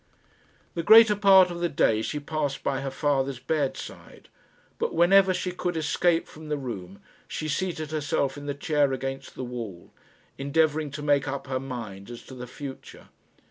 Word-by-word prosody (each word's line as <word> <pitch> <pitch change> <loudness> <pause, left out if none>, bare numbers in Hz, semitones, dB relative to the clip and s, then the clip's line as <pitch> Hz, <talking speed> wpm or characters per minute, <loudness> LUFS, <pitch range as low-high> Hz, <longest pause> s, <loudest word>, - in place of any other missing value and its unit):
The 170 - -2
greater 220 +3 +8
part 190 -3 +6
of 170 - -5
the 175 0 0
day 110 -7 +2
she 150 +6 -3
passed 145 -1 -3
by 135 -1 -1
her 135 - -3
father's 135 -1 0
bedside, 140 +2 -4 0.5
but - - -1
whenever 190 +3 +5
she 180 0 -2
could 175 -1 -3
escape 165 +2 +1
from 155 0 -11
the 150 - 0
room, 100 -8 -7 0.3
she 155 - -4
seated 155 0 -2
herself 140 -3 -1
in 145 0 -8
the 145 - -2
chair 145 -1 +1
against 135 +1 -5
the - - -5
wall, 115 -8 -7 0.5
endeavouring 150 +2 +1
to 145 +2 -7
make 145 -1 +2
up 140 0 -4
her 130 -1 -2
mind 115 -7 -7
as 120 -1 -9
to - - -12
the 125 -1 -8
future. 135 +1 -10
145 Hz, 175 wpm, -26 LUFS, 130-160 Hz, 0.5 s, greater